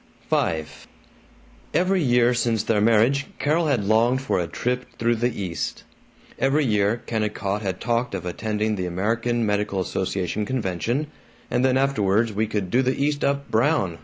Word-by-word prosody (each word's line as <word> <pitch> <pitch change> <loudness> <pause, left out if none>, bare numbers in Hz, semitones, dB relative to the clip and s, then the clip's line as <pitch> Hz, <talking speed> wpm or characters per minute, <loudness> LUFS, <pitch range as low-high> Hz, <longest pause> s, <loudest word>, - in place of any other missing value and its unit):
V 80 -1 +1 1.1
Every 185 +1 +2
year 125 -3 +3
since 115 -3 0
their 105 -2 +1
marriage 115 +6 +3
Carol 160 +3 +1
had 130 -8 +1
longed 115 +5 +3
for 135 - 0
a 85 - -1
trip 125 +8 -2
through 115 0 +1
the 120 0 -1
East. 90 -4 -4 0.6
Every 140 +2 +2
year 105 0 +1
Kennicott 105 -2 -2
had 95 -3 -3
talked 120 +1 -1
of 90 - -5
attending 105 +3 -2
the 90 -1 -2
American 115 +6 0
Medical 105 -1 0
Association 95 +2 -2
convention, 120 - -1 0.5
"and 125 - +1
then 130 0 +3
afterwards 115 -5 +1
we 110 +2 0
could 100 -4 -3
do 125 - +4
the 130 0 0
East 145 +1 0
up 140 0 -1
brown. 110 - +1
115 Hz, 160 wpm, -23 LUFS, 100-130 Hz, 1.1 s, do